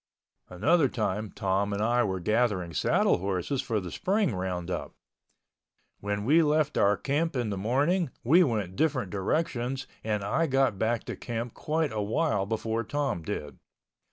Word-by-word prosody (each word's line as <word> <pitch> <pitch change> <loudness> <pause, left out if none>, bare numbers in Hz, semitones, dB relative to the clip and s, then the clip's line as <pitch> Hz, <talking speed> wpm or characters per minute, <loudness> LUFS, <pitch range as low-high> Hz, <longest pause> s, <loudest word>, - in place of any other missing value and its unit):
Another 140 - +3
time 110 -3 -2
Tom 100 0 -1
and 100 - -2
I 120 +2 +3
were 95 -1 -1
gathering 105 -4 0
saddle - - +2
horses 95 +8 -1
for 110 -3 -1
the 90 -3 -7
spring 195 - +1
roundup. 90 -1 -4 1.0
When 105 0 -3
we 155 +7 +5
left 150 -1 +2
our 100 0 +3
camp 150 +3 -1
in 120 -4 -1
the - - -1
morning 145 - +1
we 165 +9 +6
went 105 - -1
different 120 - 0
directions 125 - -1 0.2
and 105 -2 -1
I 155 +11 +1
got 135 -7 +2
back 115 0 0
to - - -5
camp 120 0 -5
quite 155 -1 -1
a 110 -1 -2
while 105 -2 0
before 115 +1 -1
Tom 140 -7 -2
did. 75 -5 -5
115 Hz, 155 wpm, -28 LUFS, 100-140 Hz, 1.0 s, we